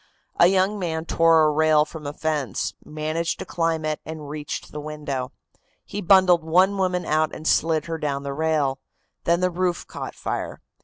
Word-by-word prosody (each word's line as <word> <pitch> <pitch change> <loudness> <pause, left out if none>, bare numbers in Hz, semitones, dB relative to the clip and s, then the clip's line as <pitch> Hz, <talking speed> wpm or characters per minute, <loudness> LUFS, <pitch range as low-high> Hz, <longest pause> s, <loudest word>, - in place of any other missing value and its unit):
A 170 - +8
young 190 +2 +2
man 160 -3 -2
tore 165 -1 +4
a 155 - +4
rail 155 0 +4
from 155 -2 -8
a 145 - -4
fence, 150 - -2
managed 155 +2 -2
to - - -6
climb 165 -2 -1
it, 155 -1 -1
and 155 -2 -7
reached 145 -1 -6
the 150 - -6
window. 145 -4 -4 0.5
He 205 - -5
bundled 180 -2 +5
one 185 +5 +3
woman 180 -2 0
out 155 0 +1
and 155 - -6
slid 160 -1 +2
her 165 -1 -4
down 140 -2 -2
the 140 0 -4
rail; 150 -3 0 0.5
then 170 +1 +2
the 185 0 +2
roof 175 -1 -1
caught - - -7
fire. - - -4
160 Hz, 185 wpm, -24 LUFS, 150-170 Hz, 0.5 s, A